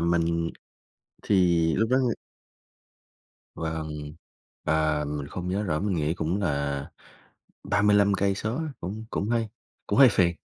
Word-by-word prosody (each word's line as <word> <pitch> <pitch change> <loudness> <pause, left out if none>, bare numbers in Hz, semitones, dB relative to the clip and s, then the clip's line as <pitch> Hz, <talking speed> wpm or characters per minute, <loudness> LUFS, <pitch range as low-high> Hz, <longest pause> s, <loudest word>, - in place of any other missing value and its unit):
mình 85 0 +1 0.7
thì 85 -4 +3
lúc 110 +3 +1
đó 130 - +4 1.6
Vâng, 80 -2 -5 0.5
à, 80 -1 +1
mình 75 -1 -4
không 90 0 -5
nhớ 100 +3 0
rõ, 75 -6 -1
mình 100 -2 0
nghĩ 75 +1 0
cũng 85 +2 -1
là 70 -5 -1 0.7
35 100 0 +3
cây 100 0 +1
số 110 +5 -3
á, 160 - -2 0.2
cũng 105 +6 -5
cũng 100 - -2
hơi 115 -2 0 0.4
cũng 105 - 0
hơi 135 - +9
phiền. 85 -4 +2
85 Hz, 135 wpm, -26 LUFS, 80-100 Hz, 1.6 s, hơi